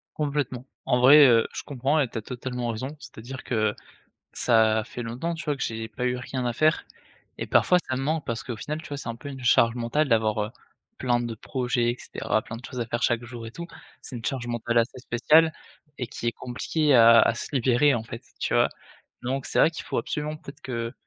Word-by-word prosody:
Complètement. 140 Hz, -4 st, -2 dB, 0.2 s
En 125 Hz, -, +2 dB
vrai, 145 Hz, +4 st, +9 dB
heu, 115 Hz, -3 st, +5 dB
je -, -, -5 dB
comprends 140 Hz, +2 st, 0 dB
et 135 Hz, -, +2 dB
tu 115 Hz, -, -7 dB
as -, -, -8 dB
totalement 125 Hz, +1 st, -4 dB
raison, 115 Hz, +4 st, -3 dB
c'est-à-dire 130 Hz, +2 st, -9 dB
que 110 Hz, -3 st, 0 dB, 0.6 s
ça 110 Hz, -2 st, +3 dB
fait 120 Hz, -, -7 dB
longtemps, 125 Hz, +9 st, -3 dB
tu 165 Hz, -, -6 dB
vois, 145 Hz, -2 st, -1 dB
que -, -, -2 dB
j'ai 110 Hz, -1 st, -4 dB
pas 125 Hz, +3 st, -4 dB
eu 125 Hz, 0 st, +1 dB
rien 125 Hz, 0 st, -4 dB
à 120 Hz, -, 0 dB
faire 155 Hz, +5 st, +2 dB, 0.5 s
et -, -, -3 dB
parfois 180 Hz, -1 st, +4 dB
ça 130 Hz, -, 0 dB
me 135 Hz, -, -2 dB
manque 155 Hz, +1 st, -1 dB
parce 115 Hz, -1 st, -3 dB
qu'au 120 Hz, -3 st, -5 dB
final 150 Hz, +8 st, -5 dB
tu -, -, -11 dB
vois 145 Hz, -, -4 dB
c'est 135 Hz, -, -6 dB
un 115 Hz, -, -4 dB
peu 145 Hz, -, -10 dB
une 135 Hz, -2 st, -8 dB
charge 115 Hz, -1 st, +4 dB
mentale 125 Hz, +6 st, 0 dB
d'avoir, 110 Hz, -2 st, +2 dB
heu, 105 Hz, +2 st, -3 dB, 0.5 s
plein 120 Hz, -2 st, +1 dB
de 120 Hz, -2 st, -4 dB
projets 125 Hz, 0 st, -1 dB
et 120 Hz, -, -6 dB
cetera, 110 Hz, -, -2 dB
plein 110 Hz, -, -7 dB
de 120 Hz, -, -10 dB
choses 125 Hz, -2 st, -7 dB
à 115 Hz, -, -1 dB
faire 120 Hz, +1 st, -3 dB
chaque 120 Hz, 0 st, +1 dB
jour 120 Hz, -1 st, -8 dB
et 115 Hz, -, -8 dB
tout. 170 Hz, +4 st, -7 dB, 0.3 s
C'est 130 Hz, -, -8 dB
une 115 Hz, -, -7 dB
charge 130 Hz, -3 st, -2 dB
mentale 120 Hz, 0 st, -1 dB
assez 115 Hz, +2 st, +1 dB
spéciale 150 Hz, +7 st, +4 dB, 0.5 s
et 125 Hz, -, -3 dB
qui 120 Hz, -, -5 dB
est -, -, +2 dB
compliquée 145 Hz, +5 st, -1 dB
a 115 Hz, 0 st, +8 dB
a -, -, +4 dB
se -, -, -6 dB
libérer, 130 Hz, +2 st, +3 dB
en 115 Hz, -, -1 dB
fait, 115 Hz, 0 st, -8 dB, 0.2 s
tu -, -, -1 dB
vois? -, -, +4 dB, 0.5 s
Donc 130 Hz, +2 st, -2 dB
c'est -, -, +1 dB
vrai 165 Hz, -, +6 dB
qu'il 160 Hz, -, -8 dB
faut -, -, -2 dB
absolument 150 Hz, +1 st, -3 dB
peut-être 145 Hz, -1 st, -12 dB
que 115 Hz, -3 st, -4 dB
125 Hz, 235 wpm, -26 LUFS, 115-140 Hz, 0.6 s, vrai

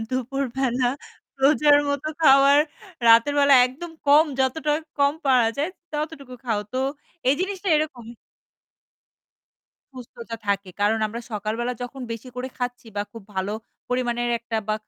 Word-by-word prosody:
দুপুরবেলা 260 Hz, -1 st, -1 dB, 0.6 s
রোজার 290 Hz, +1 st, +5 dB
মত 285 Hz, -1 st, -1 dB, 0.2 s
খাও 275 Hz, -3 st, +7 dB
আর 290 Hz, -, +6 dB, 0.5 s
রাতের 230 Hz, +5 st, +6 dB
বেলা 280 Hz, -1 st, +6 dB
একদম 305 Hz, +7 st, -9 dB, 0.2 s
কম 290 Hz, +2 st, +7 dB, 0.2 s
যতটা 295 Hz, +4 st, 0 dB, 0.3 s
কম 280 Hz, 0 st, +3 dB
পাওয়া 250 Hz, -4 st, +4 dB
যায় 295 Hz, +4 st, 0 dB, 0.2 s
ততটুকু 295 Hz, -4 st, -5 dB
খাও। 220 Hz, -4 st, 0 dB
তো 255 Hz, -, -1 dB, 0.5 s
এই 270 Hz, -, +5 dB
জিনিসটা 385 Hz, 0 st, -3 dB
এরকম। 300 Hz, -6 st, -3 dB, 1.9 s
সুস্থতা 235 Hz, -2 st, -9 dB
থাকে 200 Hz, -1 st, 0 dB
কারণ 210 Hz, +2 st, +2 dB
আমরা 225 Hz, +2 st, -6 dB
সকালবেলা 215 Hz, +4 st, -2 dB
যখন 250 Hz, +2 st, -7 dB
বেশি 230 Hz, +3 st, -8 dB
করে 250 Hz, +1 st, -4 dB
খাচ্ছি 245 Hz, -1 st, -4 dB
বা 205 Hz, -, +1 dB
খুব 230 Hz, -2 st, -10 dB
ভালো 190 Hz, +2 st, -2 dB, 0.4 s
পরিমাণের 240 Hz, -1 st, -1 dB
একটা 230 Hz, -1 st, -4 dB
বা 215 Hz, -, +2 dB
255 Hz, 135 wpm, -24 LUFS, 230-285 Hz, 1.9 s, খাও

